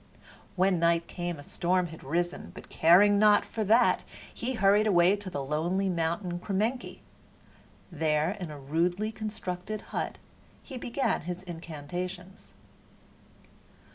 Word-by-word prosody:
When 185 -1 +2
night 170 0 +2
came 175 -2 -4
a 145 - -10
storm 180 +3 0
had 160 - -11
risen, 175 +5 -2
but - - -11
caring 200 +5 +5
not 210 -1 +5
for 220 - -3
that 230 +4 +4 0.3
he 250 +3 -3
hurried 205 0 +4
away 180 -1 +5
to 200 -2 -6
the 145 -6 -4
lonely 170 +7 0
mountain 175 +1 -1
Kremenki. 215 +7 -2 0.9
There, 155 0 +1
in 190 -5 -6
a 150 - -8
rudely 175 +9 -1
constructed 210 -2 -5
hut, - - -2 0.5
he 265 - -9
began 245 +3 -1
his 180 +3 -6
incantations. 175 +2 -7
180 Hz, 130 wpm, -29 LUFS, 170-205 Hz, 0.9 s, caring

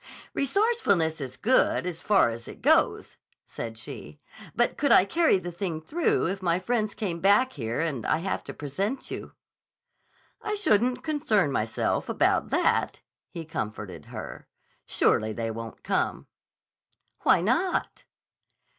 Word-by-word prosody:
"Resourcefulness 275 - +1
is 130 -1 -6
good 250 -5 +2
as 170 -3 -4
far 195 - +4
as 115 0 -8
it - - -11
goes," - - +2 0.3
said 115 -1 -7
she. 110 +6 -9 0.4
"But 240 - +2
could 285 - +1
I 185 - +7
carry 325 - +3
the 175 -1 -6
thing 170 -2 -3
through 315 - 0
if 195 +3 -2
my 170 -2 +1
friends 215 +2 -1
come 180 -6 -3
back 205 +8 +4
here 115 -1 -3
and 145 -8 -2
I - - +2
have 190 +4 -3
to - - -7
present 195 - -3
you?" - - -6 1.1
"I 425 0 -2
shouldn't 245 - +2
concern 280 - +1
myself 110 -4 -1
about - - +2
that," - - +1 0.3
he 170 -2 -7
comforted 105 - -5
her. - - -8 0.4
"Surely 110 0 +2
they 115 0 -3
won't 115 0 -8
come." - - -1 0.9
"Why - - +4
not?" 260 - 0
180 Hz, 140 wpm, -27 LUFS, -, 1.1 s, I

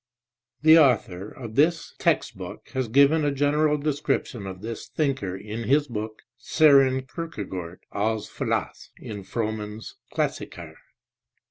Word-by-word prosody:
The 160 +1 +8
author 105 - +2
of 115 -4 -9
this 160 +6 +2
text - - +1
book - - -9
has 130 -2 -2
given 140 +6 +5
a 145 - +2
general 150 +2 +2
description 140 -7 -2
of 95 -1 -7
this 115 +1 -6
thinker 130 - -1
in 110 +3 -6
his 145 +5 +3
book 110 -2 -6 0.2
Sorcn 135 -2 +4
Kierkegaard, 100 - -6
ah 110 +2 0
Philosoph 105 - -3
(in 105 -2 -7
Frommann 110 0 -3
s 110 - -9 0.2
Klassiker) - - -3
125 Hz, 130 wpm, -25 LUFS, 105-145 Hz, 0.2 s, The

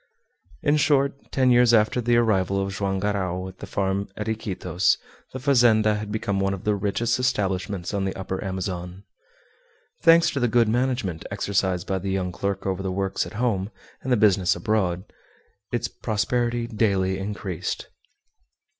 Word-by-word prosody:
In 145 +1 +3
short, 140 -2 +1
ten 130 -1 +3
years 120 -1 +6
after 110 +3 +2
the 120 0 +3
arrival 100 -4 +2
of 95 0 -2
Joam 100 -1 -1
Garral 95 -2 -1
at 95 0 -12
the - - -8
farm 100 0 -1
at 105 - -4
Iquitos 95 -4 0 0.3
the - - -5
fazenda 120 -5 +4
had 105 0 -5
become 100 -2 -1
one 95 0 0
of 95 - -11
the 105 - +2
richest 105 +5 0
establishments 100 -6 -1
on 100 -1 0
the 95 - -2
Upper 95 0 -4
Amazon. 95 -1 -4 1.0
Thanks 165 0 +6
to 140 - -2
the 120 - +2
good 115 0 +3
management 120 -7 -1
exercised 95 -3 -1
by 95 -1 -1
the 95 +2 -4
young 95 -1 -1
clerk 100 +1 -3
over 95 -1 -1
the 95 -1 -2
works 95 0 -1
at - - -11
home 110 -4 0 0.3
and 130 - -4
the 125 - +4
business 95 -4 +3
abroad, 95 -5 0 0.7
its 120 0 -1
prosperity 120 +2 -1
daily 100 -5 0
increased. 95 -3 -4
100 Hz, 165 wpm, -24 LUFS, 95-120 Hz, 1.0 s, years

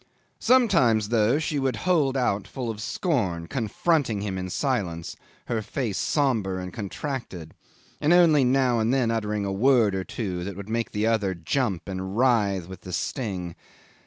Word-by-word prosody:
Sometimes, 165 - +3
though, 115 +3 +3
she 155 -2 -1
would 135 -1 0
hold 150 -7 +2
out 100 -6 0
full 120 +3 -4
of 110 -1 -8
scorn, 110 - -1
confronting 120 - 0
him 100 -2 -3
in 95 0 -4
silence, 90 - -2 0.3
her 115 -2 -1
face 110 -1 -3
sombre 115 -10 +1
and 90 -1 -6
contracted, 100 - -5 0.5
and 150 - +2
only 165 -5 +6
now 125 -2 +2
and 110 +2 +1
then 130 -4 +2
uttering 105 -2 -1
a 100 - -2
word 115 -1 +4
or 95 0 -2
two 95 -4 -4
that 100 +1 -5
would 100 +2 -8
make 115 +1 -1
the 105 +1 -1
other 105 -4 +1
jump 90 - -1
and 95 +1 -4
writhe 105 -8 +2
with 95 -1 -10
the 90 - -9
sting. 95 -9 -3
110 Hz, 165 wpm, -25 LUFS, 95-130 Hz, 0.5 s, only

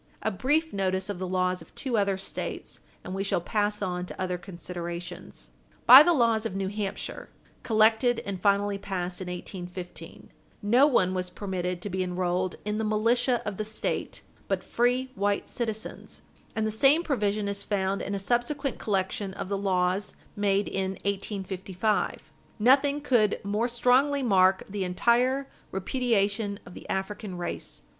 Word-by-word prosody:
A 220 - +1
brief 295 - +1
notice 190 0 0
of 185 - -6
the 185 - -3
laws 185 0 0
of - - -16
two 260 -4 -2
other 200 -2 +2
States, 195 - -5 0.2
and - - -6
we 195 +1 -1
shall 200 - +1
pass 210 +3 -1
on 180 -1 -2
to - - -9
other 180 -1 -2
considerations. 175 - -7 0.3
By 255 +3 +12
the 345 - +5
laws 230 -7 +3
of 225 -5 -3
New 195 -1 -1
Hampshire, 205 -1 -4 0.3
collected 225 +2 +3
and 195 -2 -4
finally 200 0 +2
passed 185 -2 -4
in 185 - -5
1815, 180 0 -8 0.3
no 245 +7 +5
one 185 -10 +3
was 180 -1 -2
permitted 180 -2 -3
to 205 - -3
be 190 +1 -1
enrolled 180 0 -1
in 210 +1 -1
the - - 0
militia 235 +3 +2
of 205 -2 -3
the 215 - -1
State 215 +1 -3 0.2
but - - -1
free 250 +2 +1
white 205 -3 0
citizens, 220 -2 -5 0.3
and 220 -1 0
the 220 - 0
same 275 +9 +4
provision 210 -8 0
is 200 0 -2
found 195 -1 -1
in 200 - -3
a - - -1
subsequent 245 +7 -1
collection 195 -1 -1
of - - -5
the 200 - 0
laws 190 0 0 0.2
made 205 0 +1
in 190 0 -2
1855. 195 0 -2 0.3
Nothing 280 +5 +4
could 235 -7 +2
more 210 +4 0
strongly 255 +4 +3
mark 190 -4 +4
the 200 -1 -3
entire 245 +9 +2 0.2
repudiation 205 -1 0
of - - -11
the - - -11
African 195 0 -3
race. 175 - -3
200 Hz, 160 wpm, -27 LUFS, 185-230 Hz, 0.3 s, By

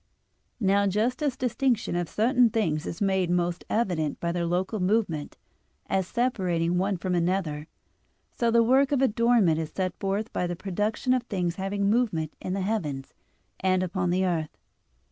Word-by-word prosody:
Now 200 -1 +3
just 220 +7 0
as 280 -4 0
distinction 250 -5 0
of 175 -2 -1
certain 240 +2 +3
things 165 -9 -1
is 170 - -3
made 190 -2 +1
most 175 0 0
evident 175 -10 0
by 170 - -1
their 170 0 -1
local 185 +5 -1
movement, 180 -6 0 0.5
as 190 -2 0
separating 180 -9 0
one 195 0 0
from 180 +1 -2
another; 170 -4 -1 0.7
so 235 - +1
the 230 0 +4
work 265 +4 +3
of 275 -2 +2
adornment 230 -8 +3
is 160 -1 -3
set 185 -2 -1
forth 200 +3 -2
by 180 - -1
the 175 - -3
production 210 +7 -1
of 255 - +2
things 180 -6 -2
having 200 +1 -1
movement 205 -9 +1
in 185 - -3
the 195 - -1
heavens, 155 -10 -3 0.5
and 185 -1 +2
upon 180 0 -1
the 185 +2 +1
earth. 165 -4 -2
190 Hz, 165 wpm, -26 LUFS, 175-225 Hz, 0.7 s, the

